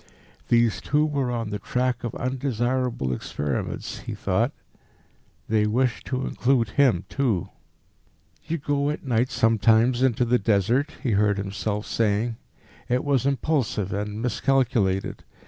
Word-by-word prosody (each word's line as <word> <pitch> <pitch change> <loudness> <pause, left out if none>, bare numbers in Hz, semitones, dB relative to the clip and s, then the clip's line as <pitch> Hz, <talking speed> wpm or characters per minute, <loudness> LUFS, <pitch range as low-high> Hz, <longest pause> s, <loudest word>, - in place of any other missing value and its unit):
These 115 -5 +3
two 150 +1 +2
were 140 -4 -1
on 115 -3 -3
the 105 - -3
track 125 +4 -1
of 120 - -4
undesirable 125 - -1
experiments, 70 +2 -3
he - - -6
thought.... - - 0 1.0
They 105 -1 +2
wished 120 +1 0
to 130 0 -2
include 120 -3 +1
him 110 -7 +2
too. 120 -11 -1 1.0
"You 165 +1 -1
go 145 -1 0
at 150 - -4
night 120 0 +1
sometimes 115 0 +3
into 125 -2 +2
the 120 +1 +2
Desert?" 115 - +1
he 125 - 0
heard 100 0 +2
himself 100 +2 -3
saying. 110 +1 0 0.5
It 125 +1 +1
was 140 -2 +1
impulsive 135 - 0
and 105 +2 -3
miscalculated. 120 -6 +1
120 Hz, 130 wpm, -25 LUFS, 105-130 Hz, 1.0 s, These